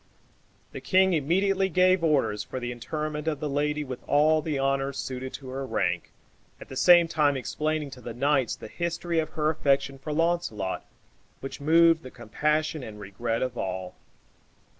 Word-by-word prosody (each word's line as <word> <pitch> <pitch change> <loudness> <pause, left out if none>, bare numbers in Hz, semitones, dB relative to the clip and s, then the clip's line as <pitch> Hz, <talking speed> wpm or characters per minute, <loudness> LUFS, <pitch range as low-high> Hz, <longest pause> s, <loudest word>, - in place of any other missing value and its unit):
The - - -7
king 190 0 +3
immediately 190 +5 +1
gave 185 0 +3
orders 135 -9 +1
for 130 - -6
the 120 -1 -4
interment 150 +5 -4
of 150 -3 -1
the 150 - -2
lady 150 +1 0
with 130 -3 -6
all 155 +2 +4
the 150 -2 -2
honors 135 0 0
suited 130 0 -4
to 135 -2 -8
her 135 +1 -4
rank, 95 -8 -1 0.5
at - - -12
the 130 - -8
same 175 +4 +6
time 145 -4 +2
explaining 155 +2 -2
to 130 -2 -11
the 115 -2 -7
knights 135 -1 +1
the - - -10
history 170 +4 -2
of 155 - -1
her 155 -1 +1
affection 140 -3 0
for 145 +3 -6
Launcelot, 155 - -1 0.6
which 135 +1 -7
moved 165 +2 +5
the 130 - -9
compassion 150 +7 -1
and 110 -4 -9
regret 115 +4 -3
of 125 -1 -4
all. 95 -1 -4
145 Hz, 170 wpm, -27 LUFS, 130-160 Hz, 0.6 s, same